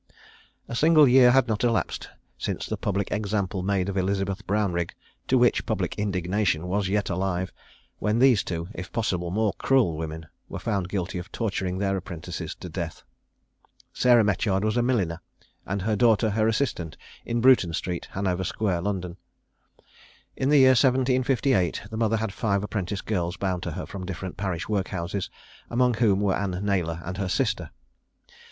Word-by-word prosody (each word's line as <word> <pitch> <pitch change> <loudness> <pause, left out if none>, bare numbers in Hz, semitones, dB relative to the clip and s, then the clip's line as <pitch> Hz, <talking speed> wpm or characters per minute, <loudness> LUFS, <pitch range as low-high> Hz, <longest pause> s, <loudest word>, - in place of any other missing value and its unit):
A - - -7
single 155 +2 +6
year 125 0 +7
had 130 0 +4
not 110 0 -1
elapsed 115 -2 0 0.3
since - - -3
the - - -3
public 100 -1 -2
example 100 -2 -1
made 95 0 0
of 100 - -3
Elizabeth 95 +1 -1
Brownrigg, 95 -4 0 0.3
to 130 - +3
which 120 -1 +4
the - - -2
public - - -1
indignation 95 -3 0
was 100 +1 0
yet 100 0 0
alive, 95 0 -2 0.5
when 105 +2 +1
these 125 -4 +5
two, 85 -1 -4
if 90 -1 -7
possible, 90 -6 -1
more 105 +2 +1
cruel 125 -12 +3
women, 80 0 -5 0.2
were - - -5
found 100 -5 -2
guilty 95 -2 -3
of 90 - -9
torturing 95 -5 -2
their 95 0 0
apprentices 85 -3 -6
to - - -9
death. 85 -3 -5 0.9
Sarah 120 -2 +5
Metyard 100 -1 +1
was 110 0 0
a 120 - +3
milliner, 95 -10 0 0.5
and 100 0 -2
her 110 +1 +1
daughter 110 0 +3
her 110 +1 +2
assistant, 110 - -1 0.3
in 120 0 -1
Bruton 120 -8 +5
street, 85 +1 -3
Hanover 95 -1 -1
square, 95 -2 -1
London. 90 -2 -3 1.2
In 130 - 0
the 150 - +5
year 130 -1 +7
1758 130 -5 +2
the 110 - -4
mother 115 0 +2
had 110 -2 -3
five 100 -3 0
apprentice 100 -2 -3
girls 90 -4 -2
bound 95 -3 -1
to 85 - -4
her 90 - -5
from 95 -2 -7
different 95 0 -5
parish 90 -4 -3
workhouses, 95 -2 -2 0.4
among 125 +1 +2
whom 105 -4 +2
were 100 -2 +2
Anne 95 -2 -2
Naylor 85 -4 0
and 90 +1 -5
her 95 -2 -2
sister. - - 0
100 Hz, 170 wpm, -26 LUFS, 90-110 Hz, 1.2 s, year